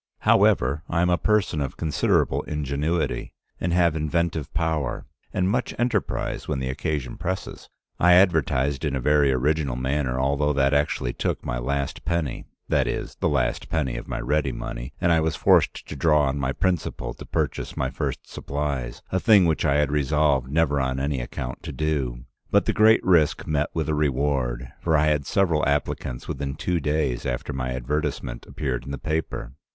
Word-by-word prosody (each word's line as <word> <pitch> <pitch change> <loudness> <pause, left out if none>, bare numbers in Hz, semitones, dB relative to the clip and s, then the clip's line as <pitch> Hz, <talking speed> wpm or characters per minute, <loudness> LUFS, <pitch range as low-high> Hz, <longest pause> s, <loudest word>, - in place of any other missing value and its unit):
However, 70 +5 +3
I 85 0 +1
am 90 - +2
a 90 - +3
person 105 -5 +1
of 70 - -4
considerable 80 -3 +1
ingenuity, 75 +3 -2 0.3
and 90 - -1
have 85 -2 +3
inventive 80 0 -1
power, 80 -5 -1 0.3
and 90 - 0
much 120 +5 -1
enterprise 120 -4 -1
when 75 - -1
the 65 -1 -2
occasion 70 -3 -3
presses. 95 +2 -5 0.3
I 90 +1 +6
advertised 80 -7 +3
in 75 -3 0
a - - -1
very 75 +1 +3
original 70 +1 +1
manner, 65 0 -1
although 70 +2 +1
that 70 0 +2
actually 70 -4 0
took - - -2
my - - -2
last 70 +3 -2
penny, 85 -5 -2 0.2
that - - +2
is, - - -3
the - - +1
last - - 0
penny 65 -7 -1
of - - -6
my - - -3
ready 70 +2 0
money, - - -6
and 85 - +2
I 80 - +4
was 80 0 0
forced - - +3
to - - -6
draw 75 +1 +3
on 70 +1 0
my 65 -1 0
principal 90 +2 -1
to - - -11
purchase - - -2
my - - -1
first - - -4
supplies, 70 -4 -4
a 95 - +1
thing 105 -4 +6
which 80 -1 +1
I 70 -2 +3
had 75 -1 +2
resolved 75 -2 +2
never 75 -2 +2
on 65 0 -1
any 70 -1 -1
account - - -6
to - - -6
do. 70 -6 -2 0.2
But - - +3
the - - +1
great 110 +1 +5
risk 85 -4 +3
met 75 -1 0
with 80 -3 -1
a 80 - 0
reward, 70 -4 0
for 80 -2 +2
I 75 +1 +3
had 75 -2 0
several 85 -6 +2
applicants 70 -3 -2
within 70 0 -3
two 90 +3 -1
days 75 -5 0
after 70 +4 -3
my 65 -1 -3
advertisement 65 -1 -3
appeared 65 -5 -3
in - - -9
the 70 - -3
paper. 80 -4 -3
75 Hz, 185 wpm, -24 LUFS, 65-80 Hz, 0.3 s, I